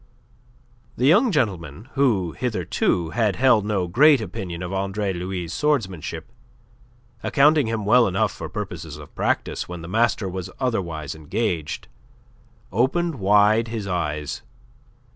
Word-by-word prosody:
The 125 Hz, -, +1 dB
young 210 Hz, -, +5 dB
gentleman 100 Hz, -, -2 dB
who, 110 Hz, -, +2 dB
hitherto, 90 Hz, -7 st, -1 dB
had 110 Hz, -3 st, +1 dB
held 120 Hz, -5 st, +4 dB
no 100 Hz, -4 st, 0 dB
great 140 Hz, -, +5 dB
opinion 90 Hz, -4 st, -5 dB
of 90 Hz, +1 st, -5 dB
Andre 95 Hz, +1 st, -1 dB
Louis' 90 Hz, -1 st, -4 dB
swordsmanship, 95 Hz, -, -1 dB, 0.9 s
accounting 150 Hz, 0 st, +4 dB
him 110 Hz, -2 st, -2 dB
well 120 Hz, +3 st, +5 dB
enough 95 Hz, 0 st, +1 dB
for -, -, -7 dB
purposes -, -, -6 dB
of -, -, -12 dB
practice -, -, -1 dB
when 90 Hz, -2 st, -7 dB
the -, -, -7 dB
master 110 Hz, +1 st, +1 dB
was 95 Hz, -1 st, -5 dB
otherwise 85 Hz, -, -2 dB
engaged, 80 Hz, +1 st, -3 dB, 0.8 s
opened 135 Hz, -, 0 dB
wide 105 Hz, +3 st, +4 dB
his 110 Hz, -3 st, -4 dB
eyes. 75 Hz, -6 st, -3 dB
100 Hz, 125 wpm, -23 LUFS, 90-120 Hz, 0.9 s, young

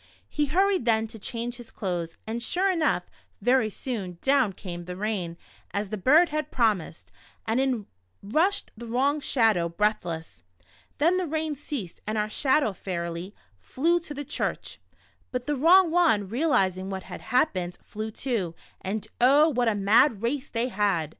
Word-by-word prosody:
He 295 Hz, -1 st, -1 dB
hurried 375 Hz, 0 st, +2 dB
then 220 Hz, -2 st, +3 dB
to 225 Hz, -, -9 dB
change 235 Hz, +3 st, -4 dB
his 240 Hz, -2 st, -11 dB
clothes, 175 Hz, -4 st, -4 dB
and 230 Hz, +2 st, -4 dB
sure 370 Hz, -, +1 dB
enough, 330 Hz, -4 st, +1 dB, 0.4 s
very 245 Hz, -3 st, +3 dB
soon, 200 Hz, -6 st, -5 dB
down 270 Hz, -6 st, +3 dB
came 175 Hz, -2 st, -7 dB
the 180 Hz, 0 st, -6 dB
rain 190 Hz, -4 st, -3 dB, 0.4 s
as 200 Hz, 0 st, -1 dB
the -, -, -1 dB
bird 300 Hz, -, +5 dB
had 305 Hz, -1 st, -2 dB
promised, 210 Hz, -9 st, -1 dB, 0.3 s
and 225 Hz, +3 st, +1 dB
in 255 Hz, -6 st, 0 dB, 0.4 s
rushed 330 Hz, -, +1 dB
the 235 Hz, +1 st, -9 dB
wrong 270 Hz, +6 st, +1 dB
Shadow, 220 Hz, -11 st, +2 dB
breathless. 170 Hz, -3 st, -2 dB, 0.6 s
Then 335 Hz, +5 st, +3 dB
the 370 Hz, -2 st, -1 dB
rain 315 Hz, 0 st, -1 dB
ceased 265 Hz, -, -6 dB
and 215 Hz, 0 st, -1 dB
our 210 Hz, 0 st, -1 dB
Shadow 265 Hz, -3 st, +2 dB
fairly 175 Hz, +1 st, -5 dB, 0.2 s
flew 330 Hz, -, +1 dB
to 305 Hz, -3 st, -8 dB
the 290 Hz, +1 st, -5 dB
church. -, -, -3 dB, 0.5 s
But 250 Hz, -1 st, -3 dB
the 295 Hz, -, 0 dB
wrong 340 Hz, +5 st, +6 dB
one, 320 Hz, -, +3 dB
real 265 Hz, -, 0 dB
izing 190 Hz, -7 st, +1 dB
what 190 Hz, -1 st, -4 dB
had -, -, -9 dB
happened, 210 Hz, -, 0 dB
flew 215 Hz, +1 st, -5 dB
too, 215 Hz, -8 st, -3 dB, 0.3 s
and 210 Hz, +3 st, -3 dB
oh, 290 Hz, +5 st, +6 dB
w^hat 240 Hz, -2 st, +3 dB
a -, -, -2 dB
mad 205 Hz, +3 st, +4 dB
race 270 Hz, +3 st, -1 dB
they 235 Hz, +2 st, -1 dB
had. 195 Hz, -8 st, 0 dB
230 Hz, 165 wpm, -26 LUFS, 195-290 Hz, 0.6 s, wrong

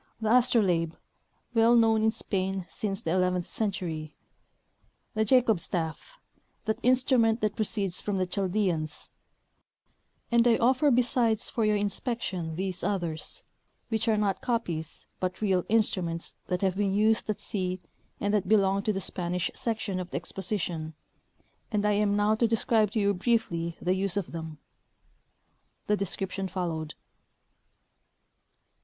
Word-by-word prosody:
The 220 Hz, 0 st, +2 dB
astrolabe, 185 Hz, -10 st, +3 dB, 0.6 s
well 230 Hz, +1 st, +5 dB
known 225 Hz, -2 st, +4 dB
in 220 Hz, -, +4 dB
Spain 190 Hz, -4 st, -1 dB
since 195 Hz, -2 st, -3 dB
the 160 Hz, -, -1 dB
eleventh 180 Hz, -1 st, +1 dB
century; 165 Hz, -8 st, -3 dB, 1.0 s
the 220 Hz, -, +1 dB
jacob 225 Hz, -3 st, +4 dB
stafF, 165 Hz, -, -3 dB, 0.5 s
that 220 Hz, -1 st, -1 dB
instrument 245 Hz, -3 st, +3 dB
that 210 Hz, -1 st, 0 dB
proceeds 200 Hz, -4 st, -1 dB
from 205 Hz, -2 st, -2 dB
the 185 Hz, -, +1 dB
Chaldeans; 180 Hz, -5 st, -1 dB, 1.2 s
and 235 Hz, 0 st, +5 dB
I 230 Hz, -, +5 dB
offer 260 Hz, +5 st, +3 dB
besides 240 Hz, -3 st, +2 dB
for 225 Hz, -, 0 dB
your 210 Hz, 0 st, +3 dB
inspection 200 Hz, -, -2 dB
these 185 Hz, +1 st, -3 dB
others, 175 Hz, -6 st, -2 dB, 0.5 s
which 225 Hz, -1 st, -1 dB
are 220 Hz, -1 st, +3 dB
not 200 Hz, -3 st, 0 dB
copies, 175 Hz, -10 st, -2 dB
but 185 Hz, 0 st, -2 dB
real 190 Hz, -4 st, +2 dB
instru 215 Hz, -4 st, +2 dB
ments 165 Hz, 0 st, -4 dB
that 180 Hz, -1 st, -1 dB
have 190 Hz, -1 st, +2 dB
been 200 Hz, -1 st, 0 dB
used 220 Hz, +1 st, +2 dB
at 210 Hz, -, -1 dB
sea 185 Hz, -3 st, -3 dB, 0.4 s
and 205 Hz, +1 st, 0 dB
that 205 Hz, -3 st, +1 dB
belong 200 Hz, -2 st, +4 dB
to 215 Hz, -, 0 dB
the 195 Hz, -2 st, -2 dB
Spanish 180 Hz, -1 st, -2 dB
section 220 Hz, -5 st, -2 dB
of 180 Hz, -1 st, -5 dB
the -, -, -3 dB
exposition, 170 Hz, -3 st, -3 dB, 0.8 s
and 210 Hz, -1 st, 0 dB
I 210 Hz, -, +3 dB
am 205 Hz, 0 st, +2 dB
now 205 Hz, +1 st, +3 dB
to 230 Hz, +2 st, +2 dB
describe 220 Hz, -1 st, +2 dB
to 225 Hz, -, +1 dB
you 200 Hz, -1 st, +3 dB
briefly 180 Hz, -5 st, 0 dB
the 180 Hz, -, +1 dB
use 195 Hz, +1 st, 0 dB
of 200 Hz, -, -2 dB
them. 160 Hz, -2 st, -6 dB, 1.3 s
(The 210 Hz, -, +2 dB
description 195 Hz, 0 st, -3 dB
followed.) 165 Hz, -4 st, -3 dB
200 Hz, 145 wpm, -28 LUFS, 180-220 Hz, 1.3 s, well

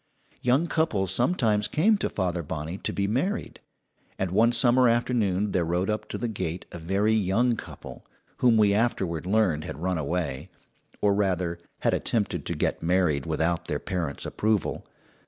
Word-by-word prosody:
Young 130 Hz, +7 st, +3 dB
couples 110 Hz, -, 0 dB
sometimes 110 Hz, -, +2 dB
came 210 Hz, +8 st, +3 dB
to -, -, -1 dB
Father 90 Hz, -3 st, -1 dB
Bonney 80 Hz, +4 st, -5 dB
to -, -, -2 dB
be 100 Hz, -, -1 dB
married; 135 Hz, -, -2 dB, 0.6 s
and 95 Hz, -2 st, -2 dB
one 110 Hz, +5 st, +4 dB
summer 120 Hz, +1 st, +5 dB
afternoon 110 Hz, -4 st, +1 dB
there 90 Hz, -, +1 dB
rode 90 Hz, +4 st, 0 dB
up 105 Hz, -, -4 dB
to -, -, -4 dB
the 120 Hz, -, -2 dB
gate 90 Hz, -5 st, -4 dB
a 85 Hz, -, -7 dB
very 100 Hz, +6 st, +1 dB
young 110 Hz, +4 st, +2 dB
couple, -, -, -10 dB, 0.3 s
whom 120 Hz, -3 st, +4 dB
we 105 Hz, -2 st, +4 dB
afterward 95 Hz, -7 st, 0 dB
learned 95 Hz, -7 st, +2 dB
had -, -, -6 dB
"run 90 Hz, +1 st, -1 dB
away," 80 Hz, -1 st, -3 dB, 0.5 s
or 100 Hz, -1 st, +3 dB
rather, 90 Hz, -4 st, 0 dB, 0.2 s
had -, -, +2 dB
attempted 110 Hz, -4 st, -1 dB
to -, -, -2 dB
get -, -, -1 dB
married 80 Hz, -5 st, +1 dB
without 85 Hz, +2 st, 0 dB
their 75 Hz, -, -2 dB
parents' 85 Hz, -5 st, -3 dB
approval. 110 Hz, -2 st, -1 dB
100 Hz, 165 wpm, -26 LUFS, 85-115 Hz, 0.6 s, summer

